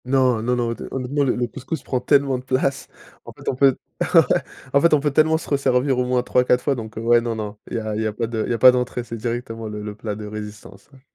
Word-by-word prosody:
Non, 130 Hz, -3 st, +2 dB
non, 125 Hz, +2 st, 0 dB
non, 120 Hz, -1 st, -1 dB
hot 115 Hz, -, -7 dB
honnêtement, 135 Hz, +2 st, -1 dB
le 130 Hz, -, +1 dB
le 120 Hz, -, 0 dB
couscous 140 Hz, +3 st, -6 dB
prend 130 Hz, -, -1 dB
tellement 135 Hz, -1 st, +2 dB
de -, -, -12 dB
place. 130 Hz, +1 st, -1 dB, 0.4 s
En -, -, -9 dB
fait, -, -, -16 dB
on -, -, 0 dB
peut 135 Hz, 0 st, +4 dB, 0.4 s
ouais, -, -, +10 dB, 0.5 s
en 140 Hz, -, +5 dB
fait, 170 Hz, 0 st, +4 dB
on -, -, +2 dB
peut 145 Hz, +1 st, 0 dB
tellement 160 Hz, +2 st, +3 dB
se 165 Hz, -, -9 dB
resservir 135 Hz, -2 st, +1 dB
au 125 Hz, -, +1 dB
moins 125 Hz, 0 st, +1 dB
3-4 125 Hz, 0 st, +2 dB
fois 145 Hz, -, +2 dB
donc, 110 Hz, -4 st, -7 dB
ouais, 115 Hz, +1 st, +3 dB
non 115 Hz, -1 st, -3 dB
non, 105 Hz, -1 st, -5 dB
il -, -, -3 dB
y -, -, 0 dB
a 110 Hz, -1 st, -4 dB
il 110 Hz, -, -2 dB
y 110 Hz, -, 0 dB
a 105 Hz, -, -3 dB
pas 115 Hz, +2 st, -2 dB
de 115 Hz, -1 st, -2 dB
il -, -, -6 dB
y -, -, +1 dB
a -, -, 0 dB
pas 130 Hz, +2 st, +8 dB
d'entrée, 125 Hz, -1 st, -2 dB
c'est 115 Hz, -, -7 dB
directement 115 Hz, -1 st, -4 dB
le 105 Hz, -1 st, -6 dB
le 105 Hz, 0 st, -5 dB
plat 105 Hz, -1 st, -5 dB
de 105 Hz, 0 st, -7 dB
résistance, 105 Hz, -1 st, -9 dB
ouais. 135 Hz, -2 st, -19 dB
125 Hz, 285 wpm, -22 LUFS, 110-135 Hz, 0.5 s, ouais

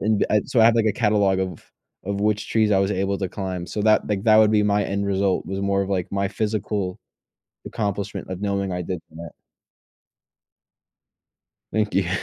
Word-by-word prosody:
and 105 Hz, 0 st, +1 dB
I 105 Hz, -, +4 dB
so 120 Hz, -, +2 dB
I -, -, +7 dB
have, 115 Hz, -, +5 dB
like, 110 Hz, -, +2 dB
a 110 Hz, -, +3 dB
catalog 105 Hz, -4 st, +2 dB
of 90 Hz, -4 st, -5 dB, 0.4 s
of 100 Hz, +1 st, -3 dB
which 105 Hz, 0 st, 0 dB
trees 110 Hz, -2 st, +2 dB
I 95 Hz, -, +4 dB
was 95 Hz, +1 st, +1 dB
able 100 Hz, 0 st, 0 dB
to 95 Hz, -2 st, -2 dB
climb. 95 Hz, -3 st, -4 dB
So 105 Hz, -, -4 dB
that 110 Hz, 0 st, +3 dB
like, 100 Hz, -2 st, -2 dB
that 110 Hz, -1 st, +6 dB
would 110 Hz, -1 st, +6 dB
be 105 Hz, -1 st, +3 dB
my 105 Hz, -1 st, +2 dB
end 100 Hz, 0 st, -2 dB
result. 95 Hz, -1 st, 0 dB
It -, -, -10 dB
was 95 Hz, 0 st, -3 dB
more 100 Hz, 0 st, +1 dB
of, 95 Hz, -, -5 dB
like, 95 Hz, -2 st, -2 dB
my 100 Hz, 0 st, 0 dB
physical 105 Hz, -2 st, -2 dB, 0.7 s
accomplishment 100 Hz, -3 st, -4 dB
of 95 Hz, +1 st, -5 dB
knowing 100 Hz, -1 st, -1 dB
I 90 Hz, -, -2 dB
did 90 Hz, 0 st, -4 dB
that. 85 Hz, +1 st, -9 dB, 2.4 s
Thank 110 Hz, -1 st, 0 dB
you. 95 Hz, -2 st, +1 dB
100 Hz, 200 wpm, -23 LUFS, 95-105 Hz, 2.4 s, I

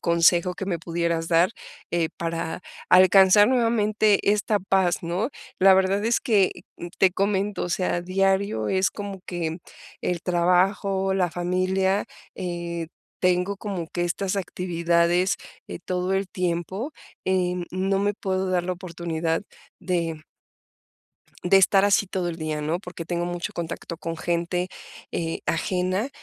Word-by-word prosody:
consejo 170 Hz, +1 st, +3 dB
que 195 Hz, -, -5 dB
me 180 Hz, -3 st, -2 dB
pudieras 170 Hz, 0 st, -2 dB
dar, 170 Hz, +2 st, +4 dB, 0.4 s
eh, 170 Hz, -2 st, +1 dB
para 165 Hz, +1 st, -3 dB, 0.3 s
alcanzar 190 Hz, +3 st, +7 dB
nuevamente 215 Hz, -4 st, +2 dB
esta 210 Hz, 0 st, +1 dB
paz, 190 Hz, -2 st, +1 dB
¿no?, 175 Hz, +7 st, -1 dB, 0.3 s
la 190 Hz, 0 st, +7 dB
verdad 190 Hz, +2 st, +2 dB
es 235 Hz, -, +2 dB
que, 205 Hz, -5 st, +3 dB, 0.5 s
te 190 Hz, -, +5 dB
comento, 200 Hz, 0 st, 0 dB
o -, -, -4 dB
sea, 175 Hz, 0 st, 0 dB
diario 190 Hz, -, 0 dB
es 190 Hz, 0 st, +2 dB
como 200 Hz, -2 st, -7 dB
que 170 Hz, -2 st, -3 dB, 0.4 s
el 175 Hz, -2 st, -2 dB
trabajo, 190 Hz, +2 st, +2 dB
la 185 Hz, -2 st, +1 dB
familia, 185 Hz, +3 st, 0 dB, 0.3 s
eh, 170 Hz, -2 st, -4 dB, 0.3 s
tengo 180 Hz, +2 st, +1 dB
como 190 Hz, -5 st, -5 dB
que 175 Hz, -, -3 dB
estas 185 Hz, +3 st, -1 dB
actividades, 175 Hz, -1 st, +1 dB, 0.3 s
eh, -, -, -6 dB
todo 180 Hz, +1 st, -1 dB
el 195 Hz, 0 st, -1 dB
tiempo, 185 Hz, -, -3 dB, 0.3 s
eh, 180 Hz, -1 st, +1 dB
no 195 Hz, +1 st, 0 dB
me 205 Hz, +1 st, +1 dB
puedo 190 Hz, -1 st, -2 dB
dar 180 Hz, -1 st, +1 dB
la 185 Hz, +1 st, -2 dB
oportunidad 170 Hz, -2 st, -3 dB, 0.4 s
de, 170 Hz, -3 st, -1 dB
mm 155 Hz, -, -14 dB, 1.2 s
de 195 Hz, +2 st, +5 dB
estar 195 Hz, +1 st, +4 dB
así 205 Hz, 0 st, +3 dB
todo 185 Hz, -1 st, -2 dB
el 170 Hz, -, -4 dB
día, 155 Hz, -2 st, -3 dB
¿no?, 160 Hz, +3 st, -1 dB
porque 180 Hz, -3 st, -8 dB
tengo 175 Hz, +1 st, -2 dB
mucho 175 Hz, 0 st, -4 dB
contacto 170 Hz, 0 st, -5 dB
con 165 Hz, 0 st, -4 dB
gente, 175 Hz, +2 st, -1 dB, 0.4 s
eh, 165 Hz, -1 st, -2 dB
ajena, 185 Hz, +6 st, 0 dB
180 Hz, 140 wpm, -24 LUFS, 170-195 Hz, 1.2 s, alcanzar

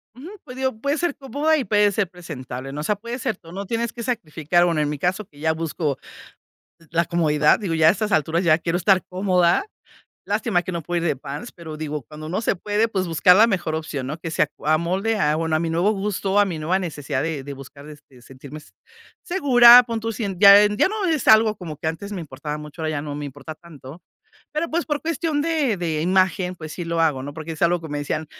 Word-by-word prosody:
Ujú, 275 Hz, +8 st, -10 dB
pues 250 Hz, -3 st, -11 dB
digo, 260 Hz, -1 st, -1 dB
puede 280 Hz, +5 st, -1 dB
ser 345 Hz, -2 st, -1 dB
cómoda 290 Hz, +4 st, 0 dB
y 280 Hz, -, -1 dB
puede 210 Hz, -1 st, +3 dB
ser 200 Hz, -2 st, -1 dB
presentable, 135 Hz, -7 st, -8 dB
¿no? 145 Hz, +2 st, -5 dB
O -, -, -4 dB
sea, 210 Hz, -, 0 dB
puedes 235 Hz, +4 st, -7 dB
ser 225 Hz, -7 st, -2 dB
tú, 165 Hz, -, -15 dB
no 195 Hz, +3 st, -6 dB
tienes 230 Hz, +2 st, -2 dB
que 235 Hz, -, -7 dB
sacrificar. 175 Hz, -, 0 dB
Bueno, 165 Hz, -3 st, +1 dB
en 150 Hz, -, 0 dB
mi 150 Hz, -, -3 dB
caso 190 Hz, +5 st, -1 dB
que 145 Hz, -5 st, -20 dB
ya 160 Hz, +1 st, +1 dB
busco 160 Hz, -3 st, -3 dB, 0.9 s
la 170 Hz, +1 st, +1 dB
comodidad, 150 Hz, -3 st, +2 dB
digo, 185 Hz, -7 st, -3 dB
ya 160 Hz, -1 st, +5 dB
a -, -, +8 dB
estas 210 Hz, +2 st, -2 dB
alturas 160 Hz, +4 st, +1 dB
ya 160 Hz, -2 st, +4 dB
quiero 170 Hz, +1 st, -2 dB
estar 185 Hz, +1 st, +3 dB
cómoda. 180 Hz, -, +2 dB, 0.6 s
Lástima 200 Hz, -9 st, 0 dB
que 185 Hz, -, -6 dB
no 170 Hz, -1 st, -4 dB
puedo 175 Hz, +2 st, -2 dB
ir -, -, -1 dB
de 160 Hz, -, +1 dB
pants, 140 Hz, -, -8 dB
pero 160 Hz, -3 st, -9 dB
digo, 150 Hz, -1 st, -4 dB
cuando 155 Hz, +4 st, -10 dB
no 180 Hz, -, -2 dB
se 225 Hz, -, 0 dB
puede, 210 Hz, +5 st, 0 dB
pues, 190 Hz, -4 st, -2 dB
buscar 175 Hz, +2 st, +5 dB
la 220 Hz, -, +7 dB
mejor 175 Hz, -7 st, -1 dB
opción, 145 Hz, -4 st, -5 dB
¿no? 155 Hz, +4 st, -5 dB
Que 165 Hz, 0 st, -6 dB
se -, -, +1 dB
ac 150 Hz, -, +1 dB
amolde 175 Hz, +8 st, +1 dB
a, 150 Hz, -3 st, +2 dB
bueno, 160 Hz, -1 st, -1 dB
a 155 Hz, -, +1 dB
mi 165 Hz, -, -2 dB
nuevo 175 Hz, +6 st, +2 dB
gusto, 200 Hz, -1 st, 0 dB
a -, -, +5 dB
mi 180 Hz, -5 st, -4 dB
nueva 175 Hz, +5 st, 0 dB
necesidad 150 Hz, -6 st, -3 dB
de 155 Hz, -4 st, -3 dB
de 145 Hz, -, -7 dB
buscar 140 Hz, +1 st, -12 dB
de 150 Hz, -, -10 dB
de 125 Hz, -2 st, -18 dB
sentirme, 135 Hz, +4 st, -11 dB
se 150 Hz, -, -17 dB, 0.5 s
segura, 250 Hz, -8 st, +7 dB
pon 230 Hz, -1 st, -3 dB
tu 225 Hz, +1 st, -3 dB
si 220 Hz, 0 st, -4 dB, 0.2 s
ya 200 Hz, 0 st, +9 dB
ya 210 Hz, -, +1 dB
no 425 Hz, 0 st, -3 dB
es 320 Hz, -7 st, 0 dB
algo 220 Hz, 0 st, +6 dB
como 165 Hz, -6 st, -8 dB
que 155 Hz, -, -7 dB
antes 165 Hz, +6 st, -4 dB
me 190 Hz, -, -4 dB
importaba 150 Hz, 0 st, -6 dB
mucho, 150 Hz, +2 st, -9 dB
ahora 155 Hz, -, -1 dB
ya 145 Hz, -2 st, -3 dB
no 145 Hz, -1 st, -6 dB
me 145 Hz, 0 st, -5 dB
importa 145 Hz, +2 st, -8 dB
tanto, 155 Hz, -1 st, -13 dB, 0.5 s
pero, 310 Hz, +3 st, -2 dB
pues, 335 Hz, +2 st, -1 dB
por 295 Hz, -2 st, -2 dB
cuestión 320 Hz, -2 st, -1 dB
de 300 Hz, -8 st, 0 dB
de 160 Hz, -4 st, -2 dB
imagen, 185 Hz, 0 st, +1 dB
pues 155 Hz, -2 st, -8 dB
sí 175 Hz, -, -6 dB
lo 165 Hz, 0 st, -1 dB
hago, 150 Hz, -5 st, +1 dB
¿no? 145 Hz, +2 st, -7 dB
Porque 160 Hz, +1 st, -6 dB
es 160 Hz, -, -8 dB
algo 175 Hz, +1 st, +3 dB
que 160 Hz, -, -9 dB
me 145 Hz, 0 st, -4 dB
decían: 155 Hz, +2 st, -3 dB
175 Hz, 245 wpm, -22 LUFS, 155-210 Hz, 0.9 s, ya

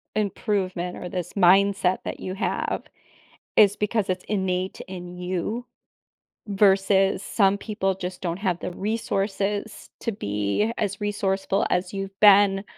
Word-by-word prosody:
improvement, 190 Hz, -4 st, -1 dB
or 180 Hz, -, -6 dB
this 180 Hz, -1 st, -4 dB
mindset 195 Hz, 0 st, +4 dB
that -, -, -5 dB
you 185 Hz, -, -5 dB
have, 195 Hz, -, -2 dB, 0.7 s
is 205 Hz, -1 st, +6 dB
because 210 Hz, -1 st, 0 dB
it's 185 Hz, 0 st, -2 dB
innate 190 Hz, -2 st, -1 dB
in 180 Hz, -1 st, -8 dB
you, 185 Hz, +6 st, -3 dB, 0.8 s
versus 195 Hz, -1 st, +3 dB
some 200 Hz, -1 st, +2 dB
people 200 Hz, -2 st, -2 dB
just 180 Hz, -1 st, -6 dB
don't 175 Hz, -1 st, -3 dB
have 185 Hz, -4 st, -1 dB
the -, -, -4 dB
resources 205 Hz, +1 st, -2 dB
to 230 Hz, -, -2 dB
be 105 Hz, -, -1 dB
as 200 Hz, -1 st, -2 dB
resourceful 195 Hz, -1 st, 0 dB
as 180 Hz, +1 st, 0 dB
you've 195 Hz, 0 st, -5 dB
been, 200 Hz, -1 st, +6 dB
195 Hz, 130 wpm, -24 LUFS, 185-205 Hz, 0.8 s, is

